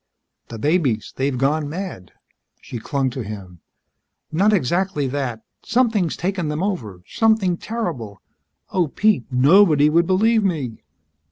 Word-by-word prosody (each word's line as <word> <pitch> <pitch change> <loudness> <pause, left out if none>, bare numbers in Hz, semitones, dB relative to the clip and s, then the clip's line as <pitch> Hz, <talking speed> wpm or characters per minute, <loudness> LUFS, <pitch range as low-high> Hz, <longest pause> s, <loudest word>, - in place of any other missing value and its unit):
"The 115 - -8
babies 140 - 0
they've 135 -1 -1
gone 145 +3 0
mad." 170 - -6 0.5
She 120 - -7
clung 135 +2 -1
to 130 - -5
him. 95 -5 -9 0.7
"Not 195 +7 +3
exactly 180 -2 0
that. 130 -4 -3 0.2
Something's 225 -8 +1
taken 185 -2 -2
them 150 +3 -2
over. 110 - -4
Something 220 -5 +2
terrible. 165 - -5 0.5
Oh, 180 -3 +1
Pete! 205 - +1
Nobody 150 +3 +5
would 170 +1 +3
believe 220 +4 +3
me." 150 - -2
155 Hz, 125 wpm, -21 LUFS, 125-190 Hz, 0.7 s, Nobody